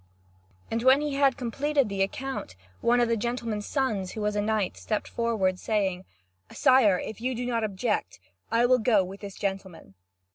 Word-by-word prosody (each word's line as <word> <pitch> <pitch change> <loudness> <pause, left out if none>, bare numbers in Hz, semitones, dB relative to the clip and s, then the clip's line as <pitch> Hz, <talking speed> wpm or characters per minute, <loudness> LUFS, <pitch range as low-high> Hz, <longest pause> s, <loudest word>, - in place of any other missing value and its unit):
And 225 +1 0
when 260 +3 +6
he 295 -1 -2
had 275 -2 +3
completed 275 +3 0
the 200 -1 -3
account, 255 - -3 0.2
one 240 +1 +3
of 240 - +3
the 230 - +1
gentleman's 230 -2 -3
sons, 215 -10 -1
who 215 - -5
was 210 0 -1
a 205 - +1
knight, 215 -2 0
stepped 215 - -3
forward, 210 -6 0
saying: 190 -4 -1 0.5
"Sire, 255 -8 +4
if 220 +4 -6
you 255 +1 -1
do 245 +1 -3
not 235 -2 -1
object, 200 - -2 0.3
I 230 +1 +3
will 250 +1 +4
go 215 -4 +3
with 190 +2 -8
this 200 -2 -8
gentleman." 190 - -5
220 Hz, 180 wpm, -27 LUFS, 195-250 Hz, 0.5 s, when